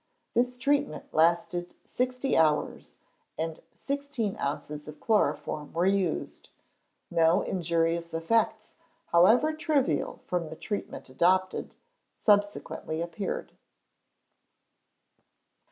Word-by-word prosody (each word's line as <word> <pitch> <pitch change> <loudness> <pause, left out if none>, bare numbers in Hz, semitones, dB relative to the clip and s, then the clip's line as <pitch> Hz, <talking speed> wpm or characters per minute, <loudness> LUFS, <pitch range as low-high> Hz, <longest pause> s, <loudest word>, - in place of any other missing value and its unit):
This 250 +1 +1
treatment 280 - 0
lasted 170 +2 +2
sixty 255 +1 -1
hours, 155 -2 +1 0.4
and 160 0 -3
sixteen 280 -7 -3
ounces 150 +1 -4
of 150 - -9
chloroform 205 -8 0
were 170 +2 +1
used. 190 -4 -1 0.6
No 165 +1 +4
injurious 170 -1 0
effects, 215 +6 0 0.4
however 225 - +5
trivial 285 - 0
from 175 -3 -2
the 160 - -7
treatment 205 +5 -5
adopted, 185 +6 +1 0.4
subsequently 205 -6 +1
appeared. 170 +4 -4
180 Hz, 90 wpm, -28 LUFS, 165-230 Hz, 0.6 s, however